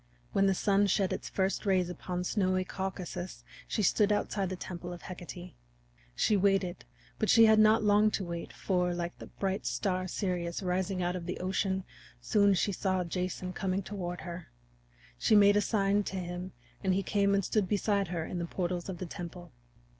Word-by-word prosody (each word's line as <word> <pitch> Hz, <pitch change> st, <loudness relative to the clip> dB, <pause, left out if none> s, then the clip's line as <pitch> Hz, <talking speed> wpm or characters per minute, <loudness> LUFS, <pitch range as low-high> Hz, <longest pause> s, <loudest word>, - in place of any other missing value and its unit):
When 195 Hz, 0 st, +3 dB
the 195 Hz, -, +3 dB
sun 200 Hz, +2 st, +3 dB
shed 195 Hz, 0 st, +1 dB
its -, -, -5 dB
first 190 Hz, 0 st, 0 dB
rays 190 Hz, -3 st, +2 dB
upon 180 Hz, 0 st, -4 dB
snowy 185 Hz, -1 st, +1 dB
Caucasus 185 Hz, -1 st, -5 dB, 0.2 s
she 215 Hz, -, -1 dB
stood 210 Hz, +2 st, +3 dB
outside 200 Hz, -2 st, 0 dB
the 185 Hz, -, -3 dB
temple 175 Hz, -1 st, -6 dB
of 175 Hz, -, -9 dB
Hecate. 180 Hz, -1 st, -8 dB, 0.6 s
She 215 Hz, -, +3 dB
waited, 195 Hz, -2 st, +1 dB, 0.3 s
but -, -, +1 dB
she 230 Hz, -1 st, +8 dB
had 220 Hz, 0 st, +6 dB
not 215 Hz, +1 st, +5 dB
long 210 Hz, +1 st, +5 dB
to 195 Hz, -, -4 dB
wait, 170 Hz, -1 st, -5 dB
for, 180 Hz, -2 st, 0 dB
like 175 Hz, 0 st, -3 dB
the -, -, -9 dB
bright 190 Hz, -10 st, -3 dB
star 185 Hz, +10 st, -1 dB
Sirius 180 Hz, -1 st, -2 dB
rising 185 Hz, 0 st, -1 dB
out 175 Hz, +1 st, 0 dB
of 175 Hz, -1 st, -5 dB
Ocean, 190 Hz, +1 st, -1 dB, 0.4 s
soon 200 Hz, -, +3 dB
she 200 Hz, -, +1 dB
saw 185 Hz, -1 st, 0 dB
Jason 180 Hz, +1 st, -3 dB
coming 190 Hz, +1 st, -1 dB
toward 180 Hz, -3 st, -5 dB
her. 170 Hz, +1 st, -7 dB, 0.7 s
She -, -, +4 dB
made 205 Hz, 0 st, +7 dB
a 205 Hz, -, +4 dB
sign 205 Hz, -1 st, +2 dB
to -, -, -4 dB
him, 180 Hz, 0 st, -5 dB, 0.3 s
and 190 Hz, -1 st, +2 dB
he 195 Hz, -, 0 dB
came 200 Hz, +1 st, +2 dB
and 195 Hz, -2 st, +1 dB
stood 210 Hz, -4 st, +1 dB
beside 200 Hz, -1 st, +1 dB
her 165 Hz, -2 st, -3 dB
in 175 Hz, -, -4 dB
the 170 Hz, -, -2 dB
portals 175 Hz, 0 st, -3 dB
of 185 Hz, -, -4 dB
the 185 Hz, -, -5 dB
temple. 175 Hz, 0 st, -8 dB
185 Hz, 185 wpm, -31 LUFS, 180-200 Hz, 0.7 s, she